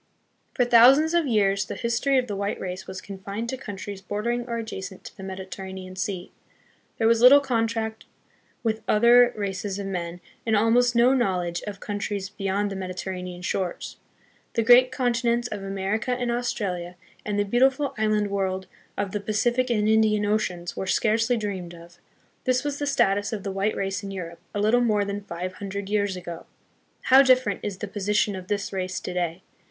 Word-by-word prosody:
For 245 - +3
thousands 260 +7 +6
of 340 -3 +2
years 200 -3 +2
the - - -6
history 245 +3 +1
of 255 - +2
the 210 -4 -4
white 200 +1 -2
race 185 0 -5
was 190 0 -6
confined 200 +3 -6
to 260 - -2
countries 205 -5 -7
bordering 235 +5 -2
or 235 -1 -2
adjacent 195 -4 -6
to - - -11
the - - -11
Mediterranean 190 0 -7
Sea. 190 -2 -4 0.7
There 225 - +2
was 230 0 +4
little 260 +4 +9
contact 225 -4 -2 0.6
with 220 -1 -1
other 240 +3 +6
races 200 -1 -3
of 200 - -4
men 175 -2 -4 0.2
and 225 -1 +1
almost 240 +3 +3
no 240 +3 +5
knowledge 180 -8 0
of 200 -2 -6
countries 205 -1 -3
beyond 200 0 -2
the - - -4
Mediterranean 185 -1 -5
shores. 180 -1 -3 0.6
The 230 - +2
great 250 +2 +7
continents 240 -2 0
of 210 -3 -5
Amer 195 +2 -1
ica 250 +2 -2
and 245 -1 -1
Australia 200 -8 -2 0.3
and 210 -1 -2
the 205 - +2
beautiful 265 +6 +2
island 215 -2 +1
world 190 -1 -1 0.3
of 200 -2 -2
the 210 - -2
Pacific 240 +5 0
and 215 -3 +1
Indian 215 -1 +3
oceans 185 -5 -1
were 190 - -4
scarcely 225 +4 +2
dreamed 190 -5 -4
of. 170 +1 -15 0.5
This 255 +1 +2
was 290 -1 -3
the 290 - -2
status 205 -7 +2
of 210 -3 -4
the 195 - -3
white 195 +2 0
race 195 0 -2
in 200 - -6
Europe 170 -3 -6 0.2
a - - 0
little 220 +4 +3
more 210 -4 +2
than 200 0 -4
five 180 +1 -5
hundred 200 0 -5
years 200 -2 +1
ago. 175 -2 -8 0.5
How 265 +1 +7
different 255 -6 +3
is 205 -3 -4
the 205 - -5
posi 205 +1 -2
tion 205 -1 +2
of 185 -1 -8
this 200 0 -2
race 185 -1 -2
to 180 - -6
day! 175 0 -2
205 Hz, 185 wpm, -25 LUFS, 190-235 Hz, 0.7 s, little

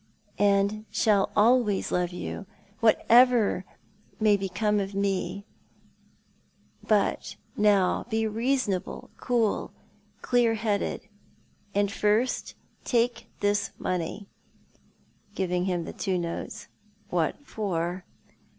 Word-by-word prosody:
"And 205 +1 +2
shall 205 -3 +2
always 220 -2 +3
love 180 -1 +1
you, 180 +2 -6 0.3
whatever 230 -3 +4 0.5
may 215 -1 +5
become 200 +2 0
of 195 0 -4
mc. 200 0 -1 1.4
But 210 -2 0 0.2
now 205 -2 +2
be 220 -1 0
reasonable, 225 -3 -1
cool, 235 -4 0 0.5
clear 240 -2 +3
headed. 215 -2 -2 0.7
And 200 0 +2
first, 215 +5 0 0.3
take 240 0 0
this 205 0 +1
money," 180 +3 -3 1.1
giving 180 -2 0
him 175 -3 -1
the - - -7
two 190 -3 -1
notes. 170 -1 -5 0.2
" 210 0 -35
What 175 - -1
for? 180 -6 -3
205 Hz, 95 wpm, -27 LUFS, 190-225 Hz, 1.4 s, may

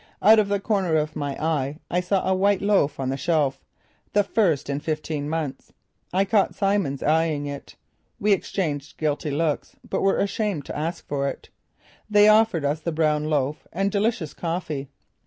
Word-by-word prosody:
Out 220 +1 +8
of 210 - +2
the 200 0 +1
corner 195 -5 0
of 155 0 0
my 145 -2 -3
eye 150 -3 -1
I 180 - +2
saw 185 +1 0
a 190 - +3
white 195 +1 +2
loaf 190 -9 +2
on 130 -1 -1
the 135 - -1
shelf, 150 -2 0 0.5
the 205 -1 +4
first 180 -9 +1
in 140 0 -2
fifteen 155 -1 -3
months. 155 -4 -4 0.4
I 190 +2 +2
caught 200 -1 +2
Simmons 195 -9 0
eyeing 155 -1 +1
it. 140 -1 -7 0.4
We 210 0 +3
exchanged 155 -7 -3
guilty 150 -1 -1
looks 150 +1 -1
but - - -1
were 195 - +3
ashamed 200 -6 -1
to - - -6
ask 160 +4 -4
for 140 -1 -1
it. - - -6 0.6
They 210 0 +6
offered 215 -7 +4
us 145 +2 0
the 170 - -3
brown 155 -1 +1
loaf 150 -1 -1
and 195 +3 0
delicious 200 -6 0
coffee. 165 -5 -4
160 Hz, 175 wpm, -24 LUFS, 145-195 Hz, 0.6 s, Out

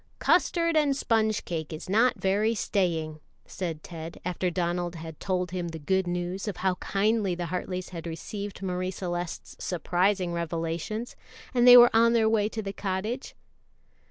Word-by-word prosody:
"Custard 335 -1 +2
and 290 -3 +3
sponge 220 -4 +1
cake 160 -3 -4
is 155 - -7
not 225 +6 +3
very 210 +4 +1
staying," 165 -7 -1 0.3
said 165 -5 -5
Ted, 165 -1 -8
after 180 0 -1
Donald 175 0 -2
had 160 -1 -8
told 180 -2 -1
him 180 -2 -3
the 165 -1 -6
good 190 +5 0
news 180 +3 -3
of 200 - -3
how 190 0 +1
kindly 200 -2 +1
the 175 0 -3
Hartleys 180 +1 -4
had 170 -2 -7
received 195 +4 -6
Marie 185 0 -2
Celeste's 175 -2 -5
surprising 180 +1 0
revelations, 170 +7 -3 0.4
and 245 -1 +4
they 245 0 +12
were 240 -1 +8
on 230 +1 +5
their 225 -2 +3
way 215 -1 +2
to 220 -1 -5
the 195 0 -4
cottage. 205 +7 -3
185 Hz, 160 wpm, -27 LUFS, 175-215 Hz, 0.4 s, they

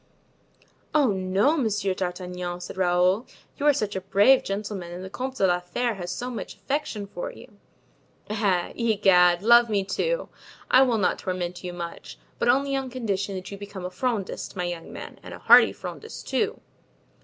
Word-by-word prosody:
"Oh, 285 -7 +4
no, 195 +9 +2
Monsieur 210 -8 0
d'Artagnan," 180 -1 -4
said 180 - -8
Raoul, 185 +4 +2 0.3
"you 290 - 0
are - - +8
such 215 -7 -2
a 190 - -2
brave 205 +8 +5
gentleman 195 -3 -4
and 180 +1 -7
the 190 - -8
Comte 260 +3 -4
de 195 - +2
la 180 -1 +3
Fere 225 +7 -2
has 175 -3 -6
so 250 +6 -4
much 230 - -6
affection 270 -7 -3
for 195 -3 -6
you!" 210 -5 -15 0.7
"Eh! 200 -5 0
Egad! 195 -6 +4
love 235 +1 +6
me 200 -2 +1
too; - - -1 0.4
I 255 - +7
will 250 -4 +3
not 200 - +1
torment 180 -1 -4
you 180 - -4
much, 170 -1 -7 0.2
but - - +2
only 275 +2 +2
on 270 -1 -2
condition 205 -6 -2
that 185 +1 -7
you 200 - -7
become 200 -2 -7
a 180 - -4
Frondist, 220 0 -3
my 180 - -2
young 175 -1 -5
friend, - - -9
and - - -9
a - - -10
hearty - - +7
Frondist, 445 - -8
too." 435 +2 0
200 Hz, 180 wpm, -25 LUFS, 180-240 Hz, 0.7 s, are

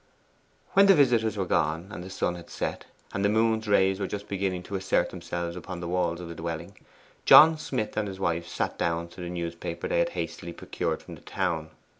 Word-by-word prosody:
When 195 +1 +7
the 195 - +8
visitors 115 - +3
were 95 - 0
gone, 80 +2 0
and 90 - -6
the 95 - -8
sun 95 -2 -1
had 85 -1 -10
set, - - -4 0.3
and 100 - -1
the 100 - +4
moon's 110 0 +2
rays 95 -1 +3
were 100 - -1
just 100 +1 -5
beginning 95 -2 -2
to 100 - -10
assert 95 -2 +1
themselves 85 -1 -4
upon 90 0 -6
the 85 - -5
walls 85 -1 0
of 90 - -7
the 85 - -6
dwelling, 85 +3 -5 0.5
John 160 +1 +9
Smith 130 -7 -3
and 105 -1 0
his 95 -1 -7
wife 85 -2 -1
sat - - -3
dawn 85 0 -1
to 90 - -11
the 90 - -4
newspaper 85 0 -4
they - - +1
had - - +2
hastily - - -4
procured - - -3
from - - -10
the - - -12
town. - - -2
95 Hz, 215 wpm, -27 LUFS, 85-105 Hz, 0.5 s, John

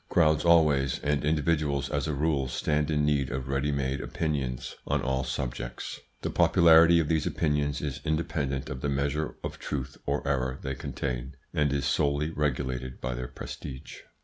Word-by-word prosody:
Crowds 80 -3 +3
always, 75 -6 +4
and 75 0 +1
individuals 75 -2 +1
as 70 +1 -1
a 75 - -1
rule, 70 -2 +1
stand 75 +3 0
in 75 -1 +2
need 70 -3 +1
of 65 +1 -4
ready 70 +2 0
made 70 -1 -1
opinions 65 -6 -2
on - - +1
all 65 0 0
subjects. 65 -2 -4 0.2
The - - -1
popularity 85 0 +6
of 80 - +1
these 80 -1 +1
opinions 75 -2 0
is 70 -2 -3
independent 75 -4 -1
of 65 -1 -5
the 70 - 0
measure 70 +2 -1
of - - -5
truth 65 -3 -4
or 70 0 -1
error 65 -2 0
they 65 -1 -3
contain, 65 0 -4 0.2
and 75 -2 +2
is 70 -1 0
solely 75 +1 +1
regulated 65 -4 -2
by 60 +1 -3
their 60 +1 -4
prestige. 65 +1 -8
70 Hz, 170 wpm, -28 LUFS, 65-75 Hz, 0.2 s, popularity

